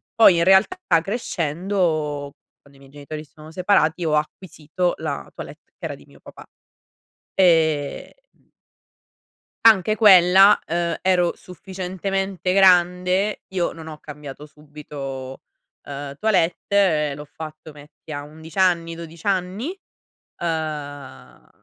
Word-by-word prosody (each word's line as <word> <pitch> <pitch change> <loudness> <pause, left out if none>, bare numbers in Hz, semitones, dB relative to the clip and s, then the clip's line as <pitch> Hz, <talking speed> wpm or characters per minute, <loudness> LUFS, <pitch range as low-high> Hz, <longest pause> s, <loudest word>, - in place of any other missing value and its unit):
poi 215 -6 +6
in 170 - +3
realtà 190 - +4 0.2
crescendo, 165 - -2 0.3
quando 140 -1 -22
i - - -21
miei 135 0 -18
genitori 150 +1 -8
si 150 - -23
sono 155 -1 -14
separati, 180 -2 +1
ho 155 - 0
acquisito 160 +2 -2
la - - -5
toilette - - -11
che - - -28
era - - -4
di - - -18
mio - - -20
papà. - - -14 0.9
Ehm 160 -6 +2 1.5
anche 215 -2 +5
quella 195 -2 +7
ehm, 170 0 -1
ero 180 -2 +2
sufficientemente 190 +1 -4
grande, 180 +1 +3
io 180 -2 0
non 160 -1 -11
ho 155 -1 -8
cambiato 150 -1 -10
subito, 145 -3 -9 0.5
uhm, 140 0 -7
toilette, 180 -5 +1
l'ho 145 - -8
fatto 155 +1 -10
metti 150 +2 -15
a 145 -1 -5
11 160 +2 -13
anni, 170 -3 +2
12 165 +1 -11
anni? 190 +5 -1 0.7
Uhm, 150 -4 -6
165 Hz, 120 wpm, -22 LUFS, 150-185 Hz, 1.5 s, quella